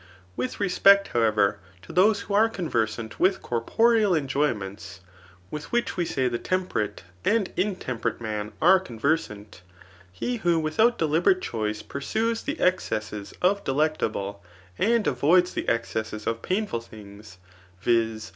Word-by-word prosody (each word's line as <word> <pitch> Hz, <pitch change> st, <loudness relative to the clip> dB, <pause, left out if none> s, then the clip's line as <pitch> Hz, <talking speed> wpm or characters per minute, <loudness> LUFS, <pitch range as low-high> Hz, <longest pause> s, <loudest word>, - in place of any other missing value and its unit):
With 125 Hz, +1 st, -3 dB
respect, 200 Hz, 0 st, +5 dB
how 120 Hz, -, 0 dB
ever, 105 Hz, -3 st, +2 dB, 0.2 s
to -, -, -11 dB
those 200 Hz, +4 st, +4 dB
who 200 Hz, -, -6 dB
are 220 Hz, +3 st, +4 dB
conversant 115 Hz, -, -2 dB
with 190 Hz, +1 st, +2 dB
corporeal 210 Hz, -, +2 dB
enjoy 145 Hz, 0 st, +1 dB
ments, 95 Hz, -1 st, -9 dB, 0.5 s
with 150 Hz, -1 st, -7 dB
which 240 Hz, 0 st, 0 dB
we 175 Hz, -, 0 dB
say 130 Hz, -5 st, 0 dB
the 120 Hz, -1 st, -2 dB
temperate 180 Hz, -, -2 dB, 0.2 s
and 210 Hz, -2 st, +1 dB
intemper 130 Hz, -, -2 dB
ate -, -, -23 dB
man 105 Hz, -2 st, -4 dB
are 190 Hz, +3 st, +7 dB
conversant, 115 Hz, -, -3 dB, 0.5 s
he 240 Hz, -, -3 dB
who 175 Hz, -6 st, +1 dB
without 220 Hz, +10 st, +2 dB
deliberate 170 Hz, +4 st, +2 dB
chdoe 105 Hz, -2 st, -3 dB
pursues 225 Hz, +11 st, -2 dB
the 295 Hz, +3 st, -4 dB
excesses 105 Hz, -, -1 dB
of 200 Hz, +2 st, +2 dB
delectable, 115 Hz, -9 st, -1 dB, 0.4 s
and 230 Hz, +1 st, +2 dB
avoids 170 Hz, +8 st, +3 dB
the -, -, -2 dB
ex 115 Hz, 0 st, -1 dB
cesses 110 Hz, -1 st, -4 dB
of 115 Hz, 0 st, -2 dB
painful 195 Hz, -, -1 dB
things, 105 Hz, -3 st, -13 dB, 0.4 s
viz. 115 Hz, 0 st, 0 dB
140 Hz, 145 wpm, -25 LUFS, -, 0.5 s, are